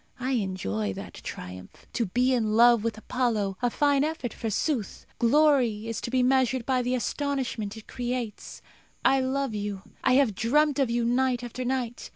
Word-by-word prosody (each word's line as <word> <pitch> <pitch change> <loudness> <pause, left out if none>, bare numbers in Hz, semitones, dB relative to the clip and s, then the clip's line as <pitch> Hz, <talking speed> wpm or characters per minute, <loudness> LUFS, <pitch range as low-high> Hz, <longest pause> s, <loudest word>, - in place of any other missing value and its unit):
I 255 +2 -2
enjoy 185 - -1
that - - -8
triumph. 90 +1 -9
To 230 -4 0
be 250 +7 +2
in 220 -4 +1
love 235 -1 +6
with 225 -1 -2
Apollo 215 -5 -1
a 245 - +2
fine 285 +2 +2
effort, 300 -7 -3
forsooth! 225 +1 -2
Glory 250 -4 +3
is 230 - -3
to - - -4
be 255 0 +2
measured 260 -1 +2
by 260 -1 +1
the 250 +1 0
astonishment 250 -4 -2
it 220 - -11
creates. 245 -3 -5 0.4
I 270 - +5
love 265 -1 -1
you. 205 -2 -4 0.2
I - - +4
have 260 -5 +4
dreamt 290 +8 +2
of 270 -3 +2
you 235 0 0
night 245 0 +1
after 245 +1 -5
night. 245 -2 -3
245 Hz, 175 wpm, -27 LUFS, 220-260 Hz, 0.4 s, love